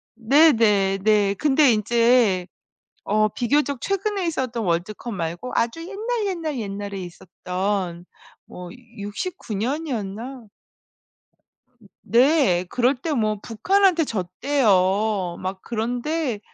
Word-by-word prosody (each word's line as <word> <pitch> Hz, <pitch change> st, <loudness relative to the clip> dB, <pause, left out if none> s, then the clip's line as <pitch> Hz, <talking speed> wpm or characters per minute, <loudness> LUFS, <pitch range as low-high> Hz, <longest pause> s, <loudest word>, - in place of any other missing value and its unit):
네 280 Hz, +8 st, +5 dB
네. 200 Hz, -4 st, +2 dB
네. 210 Hz, -2 st, +3 dB
근데 290 Hz, +1 st, +4 dB
인제 225 Hz, -3 st, +2 dB, 0.6 s
어 215 Hz, +1 st, +2 dB
비교적 280 Hz, +4 st, 0 dB
최근에 395 Hz, -1 st, -1 dB
있었던 255 Hz, -7 st, -2 dB
월드컵 190 Hz, +6 st, -2 dB
말고 175 Hz, +6 st, -4 dB
아주 235 Hz, +8 st, 0 dB
옛날, 430 Hz, +4 st, -3 dB
옛날, 330 Hz, -7 st, -3 dB
옛날에 200 Hz, -2 st, -5 dB
있었던 180 Hz, 0 st, -4 dB, 0.4 s
뭐 180 Hz, -1 st, -10 dB, 0.3 s
69 210 Hz, -, -5 dB
년이었나? 240 Hz, -1 st, -4 dB, 1.6 s
네. 245 Hz, -, +3 dB
그럴 250 Hz, +5 st, +2 dB
때 310 Hz, +6 st, -4 dB
뭐 215 Hz, -4 st, 0 dB
북한한테 360 Hz, -, +2 dB
졌대요. 200 Hz, -3 st, +1 dB
막 190 Hz, +1 st, -5 dB
그런데 245 Hz, +3 st, -2 dB
230 Hz, 200 characters per minute, -23 LUFS, 195-285 Hz, 1.6 s, 네